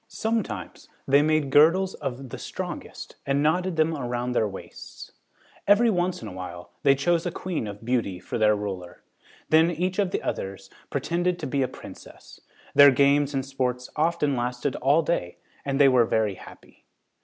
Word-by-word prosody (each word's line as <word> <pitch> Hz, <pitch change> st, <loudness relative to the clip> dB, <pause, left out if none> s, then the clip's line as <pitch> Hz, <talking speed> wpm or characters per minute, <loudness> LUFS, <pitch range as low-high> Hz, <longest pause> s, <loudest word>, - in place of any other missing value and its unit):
Sometimes 220 Hz, -, -4 dB, 0.2 s
they 140 Hz, +1 st, +5 dB
made 155 Hz, -2 st, +1 dB
girdles 170 Hz, +6 st, +5 dB
of 135 Hz, 0 st, -6 dB
the -, -, -7 dB
strongest -, -, -7 dB
and 140 Hz, +1 st, 0 dB
knotted 180 Hz, +3 st, +1 dB
them 160 Hz, 0 st, +1 dB
around 125 Hz, -2 st, -3 dB
their 110 Hz, -3 st, +1 dB
waists. 95 Hz, -, -10 dB, 0.6 s
Every 220 Hz, +3 st, +5 dB
once 180 Hz, -, -1 dB
in -, -, -6 dB
a -, -, -7 dB
while 90 Hz, -1 st, -8 dB
they 140 Hz, -1 st, +5 dB
chose 170 Hz, +5 st, +1 dB
a -, -, -2 dB
queen 170 Hz, -10 st, -4 dB
of 105 Hz, +2 st, -9 dB
beauty 115 Hz, -7 st, -1 dB
for 90 Hz, -, -5 dB
their 105 Hz, -1 st, +4 dB
ruler. 95 Hz, -4 st, -6 dB, 0.5 s
Then 160 Hz, +2 st, +5 dB
each 180 Hz, +3 st, -2 dB
of 200 Hz, -2 st, +2 dB
the -, -, -3 dB
others 95 Hz, 0 st, -5 dB, 0.2 s
pretended 170 Hz, +5 st, -1 dB
to 165 Hz, -, -6 dB
be 140 Hz, 0 st, -1 dB
a 130 Hz, -, +1 dB
princess. -, -, -13 dB, 0.3 s
Their 145 Hz, 0 st, +9 dB
games 140 Hz, +1 st, +3 dB
and 135 Hz, -1 st, -1 dB
sports 125 Hz, -2 st, -3 dB
often 150 Hz, -3 st, +1 dB
lasted 125 Hz, +2 st, -2 dB
all 145 Hz, +5 st, +3 dB
day 90 Hz, -, -2 dB, 0.3 s
and 135 Hz, 0 st, -2 dB
they 140 Hz, -, +7 dB
were 125 Hz, -3 st, +4 dB
very 110 Hz, -2 st, 0 dB
happy. -, -, -15 dB
140 Hz, 175 wpm, -25 LUFS, 120-165 Hz, 0.6 s, Their